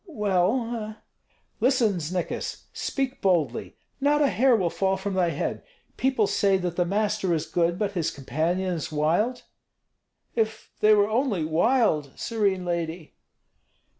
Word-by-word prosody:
"Well! 215 Hz, -, 0 dB, 0.3 s
" -, -, -41 dB
"Listen, 230 Hz, -7 st, +3 dB
Znikis, 170 Hz, +3 st, -4 dB
speak 270 Hz, -1 st, -3 dB
boldly; 165 Hz, -, 0 dB, 0.2 s
not 290 Hz, +2 st, +3 dB
a 280 Hz, -, +3 dB
hair 255 Hz, +1 st, +4 dB
will 180 Hz, -6 st, 0 dB
fall 190 Hz, 0 st, 0 dB
from 195 Hz, +1 st, -4 dB
thy 180 Hz, -2 st, +2 dB
head. 150 Hz, -, -3 dB, 0.3 s
People 260 Hz, -5 st, +2 dB
say 195 Hz, -1 st, +2 dB
that 180 Hz, -2 st, -3 dB
the 175 Hz, -, +1 dB
master 205 Hz, -2 st, 0 dB
is 155 Hz, 0 st, -2 dB
good, 170 Hz, +1 st, 0 dB
but 205 Hz, 0 st, -1 dB
his 170 Hz, -5 st, -1 dB
companions 165 Hz, +5 st, -2 dB
wild?" 175 Hz, +12 st, +1 dB, 0.9 s
"If 220 Hz, -1 st, -2 dB
they 215 Hz, 0 st, +6 dB
were 205 Hz, 0 st, +3 dB
only 215 Hz, -, 0 dB
wild, 160 Hz, -, +2 dB
serene 200 Hz, -5 st, -1 dB
lady! 170 Hz, -1 st, -3 dB
190 Hz, 135 wpm, -26 LUFS, 170-220 Hz, 0.9 s, they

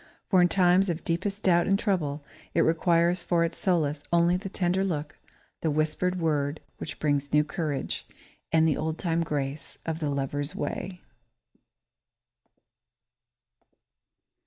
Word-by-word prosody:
For 185 Hz, -2 st, +6 dB
in 175 Hz, -, +6 dB
times 185 Hz, +1 st, +4 dB
of 170 Hz, -1 st, -3 dB
deepest 195 Hz, +5 st, -2 dB
doubt 175 Hz, -2 st, +4 dB
and 195 Hz, -, +3 dB
trouble, 155 Hz, -9 st, -1 dB, 0.3 s
it -, -, +4 dB
requires 170 Hz, +2 st, +3 dB
for 170 Hz, -1 st, +1 dB
its 165 Hz, -, -2 dB
solace 155 Hz, -6 st, +1 dB
only 170 Hz, +1 st, +4 dB
the 195 Hz, +2 st, -4 dB
tender 185 Hz, 0 st, 0 dB
look, 155 Hz, -5 st, -3 dB, 0.4 s
the 160 Hz, -, +1 dB
whispered 155 Hz, +5 st, 0 dB
word 150 Hz, -2 st, 0 dB, 0.2 s
which 155 Hz, -, -6 dB
brings 145 Hz, -2 st, 0 dB
new 150 Hz, 0 st, +4 dB
courage, 155 Hz, -2 st, -3 dB, 0.4 s
and 160 Hz, 0 st, +4 dB
the 155 Hz, -, +1 dB
old 160 Hz, +1 st, -2 dB
time 170 Hz, -2 st, 0 dB
grace 145 Hz, -2 st, -3 dB
of 160 Hz, -1 st, -2 dB
the 150 Hz, -3 st, -1 dB
lover's 140 Hz, +1 st, -2 dB
way. 180 Hz, +5 st, -4 dB
165 Hz, 135 wpm, -27 LUFS, 150-180 Hz, 0.4 s, For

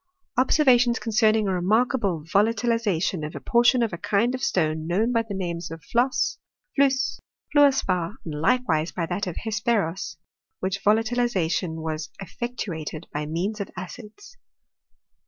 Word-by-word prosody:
" -, -, -42 dB
Observations 255 Hz, -3 st, +4 dB
concerning 220 Hz, -1 st, +2 dB
a 190 Hz, -, +1 dB
remarkable 200 Hz, -, +1 dB
volatiliza 220 Hz, 0 st, +1 dB
tion 175 Hz, -5 st, -1 dB
of 150 Hz, -, -5 dB
a -, -, -4 dB
portion 240 Hz, +1 st, +3 dB
of 225 Hz, -, -2 dB
a 170 Hz, -, -5 dB
kind 225 Hz, +7 st, +1 dB
of 255 Hz, -, -4 dB
stone 155 Hz, -6 st, 0 dB
known 210 Hz, +8 st, +1 dB
by 230 Hz, -1 st, +2 dB
the 220 Hz, -3 st, -6 dB
names 170 Hz, -2 st, -3 dB
of 165 Hz, 0 st, -9 dB
flosse, 250 Hz, +3 st, +1 dB, 0.4 s
fiusse, 275 Hz, -1 st, +2 dB, 0.4 s
fiuor 290 Hz, -1 st, +7 dB
spar, 185 Hz, -7 st, -1 dB
and 160 Hz, -, -5 dB
likewise 170 Hz, -7 st, +1 dB
by 170 Hz, -, -2 dB
that 180 Hz, +4 st, -3 dB
of 180 Hz, -, -4 dB
hesperos: 220 Hz, -5 st, -1 dB, 0.4 s
which 190 Hz, +1 st, -3 dB
volatilization 210 Hz, -7 st, +1 dB
was 155 Hz, -1 st, -3 dB
efiectuated 175 Hz, -6 st, -5 dB
by 150 Hz, 0 st, -3 dB
means 185 Hz, +7 st, -2 dB
of 200 Hz, -, -5 dB
acids." 215 Hz, -, -10 dB
205 Hz, 150 wpm, -25 LUFS, 170-240 Hz, 0.4 s, fiuor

